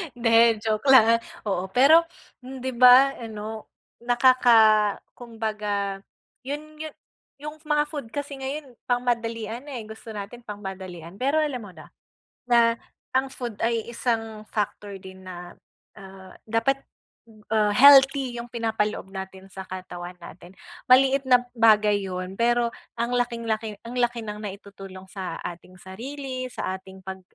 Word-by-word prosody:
Hindi, 230 Hz, -2 st, +4 dB
joke 215 Hz, +4 st, -1 dB
lang 230 Hz, -3 st, +7 dB, 0.2 s
oo 190 Hz, -3 st, -2 dB
pero 300 Hz, -, +5 dB, 0.3 s
'di 260 Hz, 0 st, -6 dB
ba 250 Hz, +2 st, +7 dB
ano 220 Hz, -1 st, -7 dB, 0.3 s
nakaka 235 Hz, -4 st, +5 dB, 0.2 s
kumbaga 215 Hz, -4 st, -4 dB, 0.4 s
yun 300 Hz, +3 st, -7 dB
yun 310 Hz, -1 st, -6 dB, 0.4 s
yung 300 Hz, +2 st, -9 dB
mga 295 Hz, -1 st, +3 dB
food 285 Hz, -6 st, -5 dB
kasi 285 Hz, -1 st, -5 dB
ngayon 270 Hz, -2 st, -6 dB
pangmadalian 235 Hz, 0 st, -2 dB
na, 280 Hz, -, -7 dB
eh, 235 Hz, -, -5 dB
gusto 220 Hz, 0 st, -10 dB
natin 205 Hz, +4 st, -7 dB
pangmadalian 190 Hz, -5 st, -8 dB
pero 275 Hz, +4 st, +1 dB
alam 275 Hz, -5 st, -2 dB
mo 205 Hz, -4 st, -10 dB
na, 155 Hz, -1 st, -14 dB, 0.5 s
na 235 Hz, -1 st, +4 dB, 0.4 s
ang 265 Hz, 0 st, +1 dB
food 240 Hz, -5 st, -5 dB
ay 230 Hz, -1 st, 0 dB
isang 225 Hz, -2 st, -2 dB
factor 205 Hz, -1 st, -3 dB
din 190 Hz, 0 st, -12 dB
na, 180 Hz, -1 st, -9 dB, 0.4 s
ah, 190 Hz, -1 st, -13 dB, 0.2 s
dapat, 270 Hz, +5 st, +1 dB, 0.7 s
ah, 215 Hz, -1 st, +3 dB
healthy 270 Hz, +1 st, +6 dB
yung 240 Hz, -, -11 dB
pinapaloob 220 Hz, -3 st, -1 dB
natin 190 Hz, 0 st, -8 dB
sa 190 Hz, -, -7 dB
katawan 180 Hz, -1 st, -8 dB
natin, 175 Hz, +1 st, -13 dB, 0.3 s
maliit 270 Hz, +2 st, +5 dB
na 250 Hz, 0 st, +5 dB
bagay 210 Hz, -2 st, +4 dB
yun 185 Hz, 0 st, -5 dB
pero 235 Hz, 0 st, +2 dB, 0.3 s
ang 240 Hz, +1 st, 0 dB
laking-laki 230 Hz, -3 st, -2 dB
ang 240 Hz, +2 st, -7 dB
laki 240 Hz, -1 st, 0 dB
ng 210 Hz, 0 st, -6 dB
naitutulong 195 Hz, -1 st, -9 dB
sa 185 Hz, -1 st, -6 dB
ating 180 Hz, +1 st, -8 dB
sarili, 255 Hz, +6 st, -6 dB
sa 185 Hz, -, -3 dB
ating 190 Hz, 0 st, -14 dB
pag, 190 Hz, 0 st, -7 dB
225 Hz, 135 wpm, -25 LUFS, 200-250 Hz, 0.7 s, lang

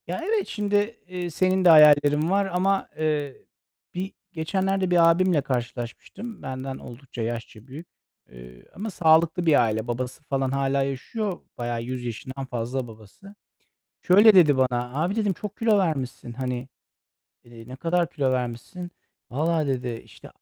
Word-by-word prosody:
Ya, -, -, -3 dB
evet, 420 Hz, +1 st, 0 dB
şimdi, 205 Hz, +1 st, -1 dB
eee, 180 Hz, -1 st, -4 dB
senin 185 Hz, +3 st, +1 dB
de -, -, +8 dB
hayallerin 150 Hz, 0 st, +6 dB
var 200 Hz, +1 st, +2 dB
ama, 195 Hz, +1 st, 0 dB
eee, 150 Hz, -3 st, -2 dB, 0.5 s
bir 190 Hz, +2 st, -4 dB, 0.2 s
geçenlerde 190 Hz, +3 st, -1 dB
bir 170 Hz, -1 st, +6 dB
abimle 180 Hz, -2 st, +2 dB
karşılaşmıştım. 130 Hz, -, -5 dB
Benden 130 Hz, 0 st, -5 dB
oldukça 120 Hz, 0 st, -9 dB
yaşça 115 Hz, 0 st, -5 dB
büyük. 150 Hz, +6 st, -10 dB, 0.4 s
Eee, 60 Hz, 0 st, -14 dB
ama 215 Hz, +4 st, -4 dB
sağlıklı 165 Hz, 0 st, +3 dB
bir 155 Hz, -5 st, +5 dB
aile. 110 Hz, 0 st, -1 dB
Babası 125 Hz, +4 st, -4 dB
falan 135 Hz, -2 st, -1 dB
hâlâ 135 Hz, 0 st, +1 dB
yaşıyor. 175 Hz, -, -4 dB, 0.2 s
Bayağı 120 Hz, -1 st, -3 dB
100 125 Hz, +1 st, -5 dB
yaşından 130 Hz, +4 st, -6 dB
fazla 125 Hz, +1 st, -3 dB
babası. 110 Hz, -, -15 dB, 0.7 s
Şöyle 205 Hz, +4 st, +7 dB
dedi 155 Hz, -7 st, +6 dB
bana; 125 Hz, -1 st, 0 dB
"Abi" 185 Hz, +5 st, -1 dB
dedim, 210 Hz, -3 st, +1 dB
"Çok 210 Hz, +3 st, -7 dB
kilo 225 Hz, -2 st, +3 dB
vermişsin. 135 Hz, -9 st, -2 dB
Hani, 125 Hz, 0 st, -4 dB, 0.8 s
eee, 120 Hz, 0 st, -14 dB
ne 130 Hz, -, -8 dB
kadar 170 Hz, +3 st, 0 dB
kilo 140 Hz, -6 st, 0 dB
vermişsin?" 125 Hz, +8 st, -4 dB, 0.4 s
"Vallahi" 155 Hz, +3 st, 0 dB
dedi, 125 Hz, -3 st, -3 dB
"İşte, -, -, -15 dB
145 Hz, 145 wpm, -25 LUFS, 125-185 Hz, 0.8 s, de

